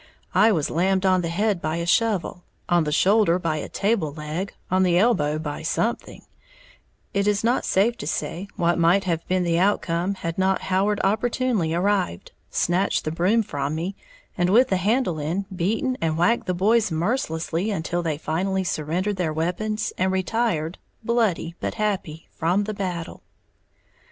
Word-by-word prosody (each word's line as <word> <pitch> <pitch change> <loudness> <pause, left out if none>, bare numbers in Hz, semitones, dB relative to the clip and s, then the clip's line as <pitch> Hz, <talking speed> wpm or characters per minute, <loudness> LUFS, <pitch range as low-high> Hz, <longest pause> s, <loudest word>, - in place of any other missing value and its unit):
I 225 - +5
was 160 -8 0
lammed 190 +3 +1
on 185 -1 +4
the 170 - -2
head 200 +1 0
by 155 +1 -1
a 170 0 -2
shovel, 190 -2 +1 0.2
on 175 -2 +3
the 150 - -1
shoulder 190 +2 +4
by 165 -3 -1
a - - -5
table 200 -7 0
leg, 155 +6 -4 0.2
on 185 0 +3
the 180 -2 +3
elbow 155 -8 +2
by 150 -2 -5
something, 225 +8 -2 0.9
it 200 0 +1
is 205 0 +1
not 240 +3 +1
safe 225 +5 +2
to 145 - -6
say 180 +4 -3
what 170 0 +1
might 175 +4 +4
have 170 -3 -2
been 185 0 +1
the 170 -1 +1
outcome 185 -1 +1
had 165 -1 -4
not 190 0 +2
Howard 200 +2 +2
opportunely 220 -4 +1
arrived, 185 - 0 0.2
snatched 180 +3 0
the 155 - -1
broom 185 +8 +2
from 145 -4 -3
me, 175 +5 -3 0.4
and, 175 0 +1
with 240 +6 +5
the 190 - +2
handle 200 -3 +1
end, 170 +7 -2
beaten 220 +9 0
and 160 -1 0
whacked 185 +7 +2
the 180 - 0
boys 215 +4 +3
mercilessly 170 -1 -1
until 175 -3 -2
they 160 -3 -2
finally 190 +5 -1
surrendered 180 +5 -2
their 170 -4 0
weapons 210 +7 -2
and 185 +1 +2
retired, 185 -4 -1 0.2
bloody 220 -8 0
but - - -3
happy, 190 -7 -3
from 180 +5 0
the 215 +1 -4
"battle." 180 -4 -4
185 Hz, 170 wpm, -24 LUFS, 165-205 Hz, 0.9 s, I